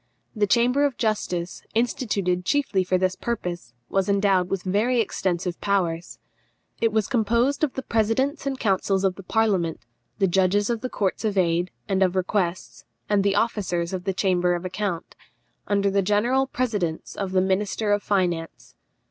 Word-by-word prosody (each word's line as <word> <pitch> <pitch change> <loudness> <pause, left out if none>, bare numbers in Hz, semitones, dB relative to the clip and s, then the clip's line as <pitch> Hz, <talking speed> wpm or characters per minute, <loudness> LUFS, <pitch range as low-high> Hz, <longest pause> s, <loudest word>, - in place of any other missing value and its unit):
The 210 -1 +2
Chamber 245 +6 +3
of 280 -4 0
Justice, 185 -6 -2
instituted 205 -6 0
chiefly 220 -5 +1
for 185 0 +1
this 185 0 0
purpose, 175 - -4
was 195 0 0
endowed 195 -2 +2
with 195 -2 -2
very 215 +6 +1
extensive 180 -4 -1
powers. 170 -9 -1 0.6
It 230 -1 +2
was 215 -1 +1
composed 235 +6 +1
of 290 - +1
the 265 - -4
presidents 260 +7 0
and 270 -1 -2
councils 195 -1 +1
of 190 -1 +2
the 195 - -10
parliament, 195 -5 0 0.4
the 195 - +3
judges 195 +4 +2
of 230 -2 -2
the 255 - -3
Courts 200 -2 -1
of 210 -2 -1
Aid 175 0 +2 0.2
and 195 -1 0
of 185 -1 +3
Requests, 185 -1 -1 0.3
and 205 -1 +3
the 200 0 +2
officers 190 -6 0
of 185 -1 -4
the 195 - +1
Chamber 180 -2 +2
of 175 +1 -5
Account, 185 -2 -3 0.5
under 200 -1 +2
the 200 0 +2
general 235 +7 +2
presidence 205 -12 -2
of 195 -2 -3
the 185 - +3
minister 200 +3 0
of 205 0 +2
finance. 175 -5 -2
195 Hz, 165 wpm, -24 LUFS, 180-220 Hz, 0.6 s, Chamber